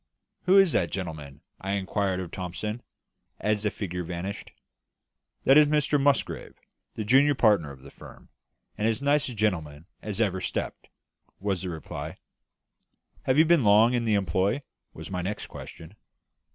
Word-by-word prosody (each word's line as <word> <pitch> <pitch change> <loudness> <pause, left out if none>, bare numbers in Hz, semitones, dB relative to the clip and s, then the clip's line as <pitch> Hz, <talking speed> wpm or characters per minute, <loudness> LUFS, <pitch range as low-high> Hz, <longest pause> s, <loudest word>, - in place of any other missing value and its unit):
"Who 190 +2 +6
is 195 -3 +6
that 85 -9 +1
gentleman?" 80 -6 -6 0.2
I 95 +1 -3
inquired 100 -1 -1
of 90 -2 -7
Thomson, 100 +6 -4 0.6
as 105 -1 0
the 105 - +1
figure 90 -4 -4
vanished. 90 +4 -6 0.9
"That 135 +3 +7
is 150 - +6
Mr 150 -1 +2
Musgrave, 140 0 0 0.4
the 110 - -3
junior 135 +6 +4
partner 105 - +3
of 65 -1 -13
the - - -12
firm, - - -14 0.5
and 105 - +2
as 115 -1 0
nice 145 0 +2
a 125 - -7
gentleman 80 -8 -1 0.2
as 105 -1 -4
ever 95 -5 +1
stepped," - - -4 0.5
was 100 -2 -1
the 95 - -4
reply. 80 -2 -6 1.1
"Have 130 +1 +2
you 160 - +7
been 165 -4 +4
long 110 +3 +5
in 120 -1 0
the 110 -2 +2
employ?" 95 - 0 0.3
was - - -10
my 90 -1 -2
next 100 +4 -4
question. 80 +5 -11
105 Hz, 160 wpm, -27 LUFS, 90-125 Hz, 1.1 s, That